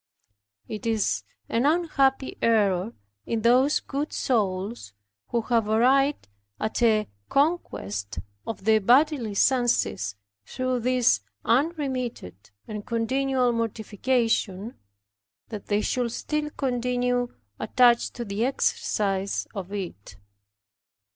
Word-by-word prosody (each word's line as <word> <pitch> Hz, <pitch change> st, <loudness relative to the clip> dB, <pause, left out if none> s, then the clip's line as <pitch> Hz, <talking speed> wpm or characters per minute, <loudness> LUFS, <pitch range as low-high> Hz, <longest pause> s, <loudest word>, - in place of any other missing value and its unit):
It 215 Hz, +1 st, -5 dB
is 210 Hz, -, +1 dB, 0.3 s
an 235 Hz, +5 st, +1 dB
unhappy 280 Hz, -5 st, +1 dB
error 210 Hz, -2 st, +2 dB, 0.3 s
in 225 Hz, -2 st, -1 dB
those 255 Hz, +5 st, +4 dB
good 290 Hz, +2 st, -4 dB
souls, 200 Hz, -, -1 dB, 0.3 s
who 235 Hz, -, 0 dB
have 225 Hz, -1 st, +1 dB
arrived 270 Hz, -, +3 dB, 0.3 s
at 220 Hz, -, -2 dB
a 215 Hz, -3 st, +3 dB, 0.2 s
conquest 105 Hz, -, -1 dB, 0.3 s
of 220 Hz, -4 st, -5 dB
the 220 Hz, +1 st, +4 dB
bodily 245 Hz, 0 st, +3 dB
senses, 155 Hz, -, +1 dB, 0.3 s
through 255 Hz, -, -2 dB
this 250 Hz, 0 st, +3 dB, 0.2 s
unremitted 255 Hz, -, -1 dB, 0.2 s
and 210 Hz, -1 st, -5 dB
continual 250 Hz, +3 st, +1 dB
mortification, 225 Hz, -1 st, -1 dB, 0.8 s
that 210 Hz, -3 st, -7 dB
they 205 Hz, 0 st, +1 dB
should 245 Hz, +1 st, -1 dB
still 300 Hz, +4 st, -2 dB
continue 245 Hz, -2 st, -1 dB, 0.2 s
attached 240 Hz, -2 st, +3 dB
to 240 Hz, -, -4 dB
the 200 Hz, +2 st, -2 dB
exercise 200 Hz, -6 st, 0 dB
of 195 Hz, -3 st, -6 dB
it. 175 Hz, -, -6 dB
235 Hz, 100 wpm, -26 LUFS, 205-255 Hz, 0.8 s, those